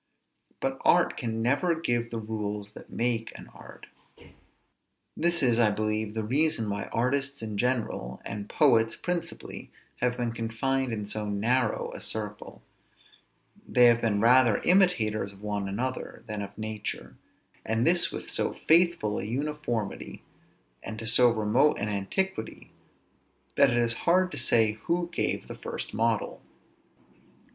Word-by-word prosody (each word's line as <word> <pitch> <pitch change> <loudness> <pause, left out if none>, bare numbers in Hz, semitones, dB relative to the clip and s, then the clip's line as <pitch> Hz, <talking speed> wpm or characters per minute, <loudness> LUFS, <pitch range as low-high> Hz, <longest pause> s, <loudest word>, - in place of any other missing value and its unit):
But - - -3
art - - +4
can 115 -1 -3
never 160 +7 +1
give 120 -7 -1
the 115 - -4
rules 105 -2 -4
that - - -13
make 115 -1 -2
an - - -12
art. - - -13 1.3
This 170 -1 +1
is, 120 -2 +3
I 110 -3 +5
believe, 110 +1 -2
the 110 - -1
reason 130 0 +1
why 100 0 -3
artists 140 +2 -1
in 110 -2 -5
general, 110 - -2
and 100 0 -5
poets, 115 -7 +3
principally, 175 -1 -5 0.3
have 125 0 0
been 120 -1 -1
confined 120 +3 -1
in 105 -2 -3
so 105 +1 -4
narrow 110 +3 0
a - - -8
circle: 105 -1 -5 1.0
they 125 - +5
have 120 -1 +5
been 105 -3 +1
rather 120 -1 +5
imitators 110 - +2
of 100 +1 -16
one 105 -2 -2
another 130 +6 -4
than 105 -1 -4
of 100 - -8
nature; 110 -1 -5 0.5
and 110 +2 0
this 175 +1 +4
with - - -7
so - - +1
faithful 165 -11 +4
an 100 - -4
uniformity, 125 -5 -4 0.6
and 110 - -7
to 115 - -6
so 120 +3 +6
remote 115 +6 +2
an 105 - -2
antiquity, 110 - -3 0.8
that 140 -1 +6
it 120 - 0
is 120 -1 +3 0.2
hard 185 +1 +3
to 145 - -6
say 115 -3 +3
who 175 0 -1
gave - - -2
the - - -6
first - - -6
model. 115 0 -1
115 Hz, 145 wpm, -28 LUFS, 105-135 Hz, 1.3 s, so